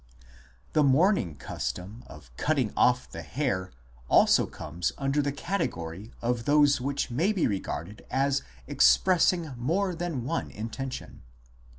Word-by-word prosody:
The 155 Hz, -, +4 dB
mourning 140 Hz, -, +3 dB
custom 100 Hz, +11 st, -5 dB
of 70 Hz, -6 st, -14 dB
cutting 135 Hz, -, 0 dB
off 125 Hz, 0 st, +3 dB
the -, -, -6 dB
hair 110 Hz, -10 st, -2 dB, 0.4 s
also -, -, +5 dB
comes 85 Hz, +3 st, -4 dB
under 140 Hz, +1 st, +1 dB
the 140 Hz, 0 st, -1 dB
category 110 Hz, -, -4 dB
of 120 Hz, -1 st, -1 dB
those 145 Hz, -2 st, +4 dB
which 140 Hz, -1 st, -2 dB
may 165 Hz, -, +2 dB
be 195 Hz, -6 st, +1 dB
regarded 100 Hz, -1 st, -4 dB
as 135 Hz, +1 st, +1 dB, 0.2 s
expressing 165 Hz, -, +3 dB
more 180 Hz, +10 st, 0 dB
than 165 Hz, -7 st, -3 dB
one 165 Hz, +7 st, -2 dB
intention. 125 Hz, +5 st, -6 dB
135 Hz, 125 wpm, -28 LUFS, 105-155 Hz, 0.4 s, also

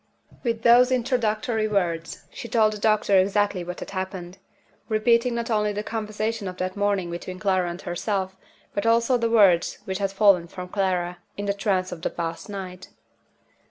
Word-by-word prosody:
With 230 Hz, -2 st, -2 dB
those 245 Hz, +2 st, +6 dB
introductory 230 Hz, -3 st, 0 dB
words, 170 Hz, -6 st, -2 dB
she -, -, -8 dB
told 220 Hz, -2 st, +3 dB
the 210 Hz, -, -7 dB
doctor 210 Hz, -2 st, +3 dB
exactly 200 Hz, -1 st, +1 dB
what 180 Hz, +1 st, -7 dB
had -, -, -7 dB
happened; 190 Hz, -1 st, -5 dB, 0.5 s
repeating 235 Hz, +2 st, +2 dB
not 235 Hz, 0 st, -3 dB
only 210 Hz, -1 st, +1 dB
the 210 Hz, +1 st, -3 dB
conversation 215 Hz, -1 st, -3 dB
of 180 Hz, 0 st, -6 dB
that 185 Hz, 0 st, -3 dB
morning 200 Hz, -4 st, 0 dB
between 185 Hz, +2 st, -6 dB
Clara 185 Hz, -2 st, +1 dB
and 170 Hz, +1 st, -6 dB
herself, 190 Hz, +1 st, -2 dB, 0.4 s
but 205 Hz, +2 st, -1 dB
also 235 Hz, +2 st, +3 dB
the 230 Hz, 0 st, +1 dB
words 195 Hz, -7 st, +4 dB
which 190 Hz, 0 st, -3 dB
had 195 Hz, -1 st, 0 dB
fallen 195 Hz, -4 st, +4 dB
from 180 Hz, +1 st, -8 dB
Clara, 180 Hz, -3 st, -1 dB, 0.2 s
in 205 Hz, -, -3 dB
the 200 Hz, -, +1 dB
trance 195 Hz, -2 st, 0 dB
of 175 Hz, -2 st, -7 dB
the -, -, -1 dB
past 165 Hz, +4 st, -5 dB
night. 185 Hz, -2 st, -7 dB
200 Hz, 175 wpm, -24 LUFS, 185-220 Hz, 0.5 s, those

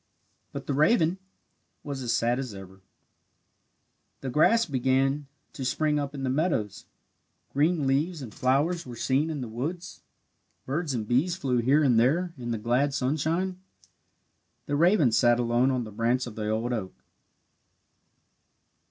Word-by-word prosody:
But -, -, -7 dB
the 145 Hz, -, -2 dB
raven 165 Hz, -, +3 dB, 0.6 s
was 140 Hz, -2 st, -5 dB
as 120 Hz, -2 st, -2 dB
sad 120 Hz, +2 st, +1 dB
as 125 Hz, -6 st, -5 dB
ever. 95 Hz, 0 st, -12 dB, 1.4 s
The 130 Hz, -, -4 dB
grass 225 Hz, -, +4 dB
began 135 Hz, 0 st, 0 dB, 0.3 s
to 135 Hz, -, -6 dB
spring 150 Hz, +3 st, +1 dB
up 140 Hz, 0 st, -4 dB
in 135 Hz, -, -5 dB
the 130 Hz, -, 0 dB
meadows. 135 Hz, -, -1 dB, 0.7 s
Green 150 Hz, +2 st, +2 dB
leaves 150 Hz, +6 st, 0 dB
and 120 Hz, -7 st, -8 dB
flowers 145 Hz, +7 st, +1 dB
were 125 Hz, -2 st, -9 dB
seen 135 Hz, +6 st, 0 dB
in 150 Hz, -4 st, -4 dB
the 125 Hz, -, -4 dB
woods. 160 Hz, +11 st, -5 dB, 0.6 s
Birds 145 Hz, 0 st, -2 dB
and 110 Hz, -3 st, -3 dB
bees 145 Hz, +10 st, +1 dB
flew 130 Hz, -8 st, 0 dB
here 135 Hz, +6 st, +3 dB
and 125 Hz, -5 st, +4 dB
there 165 Hz, +9 st, +1 dB
in 120 Hz, -4 st, -7 dB
the 115 Hz, -, -1 dB
glad 125 Hz, +6 st, +1 dB
sunshine. 160 Hz, +8 st, -1 dB, 1.0 s
The 145 Hz, -, -2 dB
raven 165 Hz, -, +4 dB
sat 120 Hz, +1 st, +4 dB
alone 120 Hz, +2 st, +2 dB
on 130 Hz, -2 st, 0 dB
the 110 Hz, -, -9 dB
branch 120 Hz, +4 st, 0 dB
of 120 Hz, -, -8 dB
the 105 Hz, 0 st, -3 dB
old 115 Hz, +3 st, -1 dB
oak. 95 Hz, -5 st, -4 dB
135 Hz, 150 wpm, -27 LUFS, 120-155 Hz, 1.4 s, grass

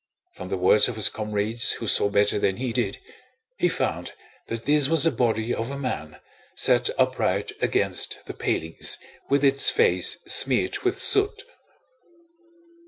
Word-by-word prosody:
From 90 Hz, -, -9 dB
the 95 Hz, -, -2 dB
words 95 Hz, +3 st, +4 dB
of 125 Hz, -, -5 dB
his 110 Hz, -2 st, +1 dB
comrades 110 Hz, +2 st, -1 dB
who 115 Hz, -, -7 dB
saw 100 Hz, -, +2 dB
better 100 Hz, +1 st, +1 dB
than 95 Hz, -1 st, -1 dB
he 125 Hz, -2 st, -4 dB
did, 120 Hz, -1 st, -2 dB, 0.6 s
he -, -, +2 dB
found -, -, -3 dB, 0.3 s
that 115 Hz, 0 st, -6 dB
this 145 Hz, -1 st, +3 dB
was 165 Hz, -2 st, +3 dB
the 165 Hz, -, +3 dB
body 115 Hz, -1 st, -1 dB
of 115 Hz, +2 st, -4 dB
a 140 Hz, -, -6 dB
man, 80 Hz, -, -6 dB, 0.4 s
set 120 Hz, -1 st, +3 dB
upright 130 Hz, -7 st, 0 dB
against -, -, 0 dB
the -, -, -8 dB
palings 80 Hz, +1 st, -1 dB, 0.3 s
with 140 Hz, +1 st, +1 dB
its 140 Hz, 0 st, +5 dB
face 460 Hz, +1 st, +2 dB
smeared -, -, +1 dB
with -, -, -2 dB
soot. 405 Hz, +2 st, +3 dB
115 Hz, 155 wpm, -24 LUFS, 105-135 Hz, 0.6 s, its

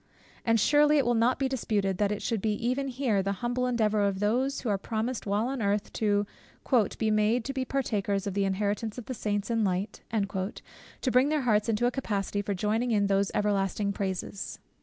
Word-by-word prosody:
And 230 Hz, -1 st, +3 dB
surely 295 Hz, +6 st, +5 dB
it 280 Hz, -, +3 dB
will 240 Hz, -, +3 dB
not 235 Hz, +2 st, +3 dB
be 270 Hz, -, +1 dB
disputed, 205 Hz, -7 st, -1 dB
that 205 Hz, -1 st, +2 dB
it 210 Hz, -, -3 dB
should 225 Hz, -4 st, -1 dB
be 215 Hz, 0 st, +1 dB
even 255 Hz, +6 st, -1 dB
here 245 Hz, -6 st, 0 dB
the 195 Hz, +1 st, -1 dB
humble 250 Hz, +1 st, 0 dB
endeavour 215 Hz, -4 st, +1 dB
of 200 Hz, -1 st, +1 dB
those, 250 Hz, +7 st, +1 dB
who 240 Hz, -, -2 dB
are 200 Hz, -, +2 dB
promised 225 Hz, +2 st, -3 dB
while 205 Hz, +4 st, +1 dB
on 265 Hz, -2 st, -3 dB
earth 205 Hz, +1 st, 0 dB
"to 205 Hz, -1 st, +1 dB, 0.7 s
be 220 Hz, -1 st, +1 dB
made 215 Hz, +1 st, +3 dB
meet 245 Hz, -, -1 dB
to 275 Hz, -, -4 dB
be 260 Hz, -1 st, -2 dB
partakers 205 Hz, -7 st, -1 dB
of 200 Hz, -, -2 dB
the 200 Hz, 0 st, +1 dB
inheritance 205 Hz, +3 st, -1 dB
of 245 Hz, -, -6 dB
the 260 Hz, -, -4 dB
saints 205 Hz, -1 st, -2 dB
in 225 Hz, -1 st, +2 dB
light," 195 Hz, +2 st, -1 dB
to 200 Hz, +4 st, -4 dB
bring 255 Hz, +3 st, +4 dB
their 305 Hz, -1 st, +1 dB
hearts 220 Hz, -3 st, +2 dB
into 225 Hz, +2 st, +1 dB
a 245 Hz, -, +3 dB
capacity 205 Hz, -6 st, -2 dB
for 205 Hz, 0 st, -2 dB
joining 215 Hz, +6 st, 0 dB
in 210 Hz, -3 st, +2 dB
those 195 Hz, 0 st, +2 dB
everlasting 200 Hz, 0 st, 0 dB
praises. 195 Hz, 0 st, -4 dB
215 Hz, 210 wpm, -28 LUFS, 200-245 Hz, 0.7 s, surely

